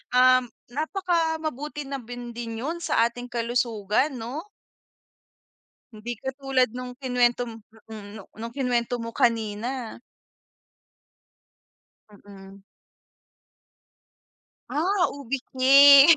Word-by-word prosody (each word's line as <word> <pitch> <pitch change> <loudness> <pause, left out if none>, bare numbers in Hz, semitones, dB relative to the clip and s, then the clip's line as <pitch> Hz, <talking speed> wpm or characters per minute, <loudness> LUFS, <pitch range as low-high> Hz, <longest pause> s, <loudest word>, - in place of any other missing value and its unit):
um, 255 0 +6 0.3
napaka 330 +2 0
mabuti 295 0 -4
na 275 0 -4
bin 245 0 -8
din 230 -1 -5
'yun 330 +5 -3
sa 230 - +3
ating 245 +1 -8
kalusugan 235 +2 0
no? 255 - -6 1.5
Hindi 220 +3 -5
katulad 265 -1 0
nung 250 +2 -7
kinuwento 245 -1 +1
mo 225 - -9 0.3
mm 215 -1 -9 0.2
nung 230 +1 -6
kinuwento 245 -3 -1
mo 230 - -4
kanina. 230 +2 -1 2.1
Mm. 195 -1 -14 2.1
Ah, 360 +5 +2
ube 275 -1 -4
cake. 280 +4 +9
250 Hz, 95 wpm, -25 LUFS, 230-280 Hz, 2.1 s, cake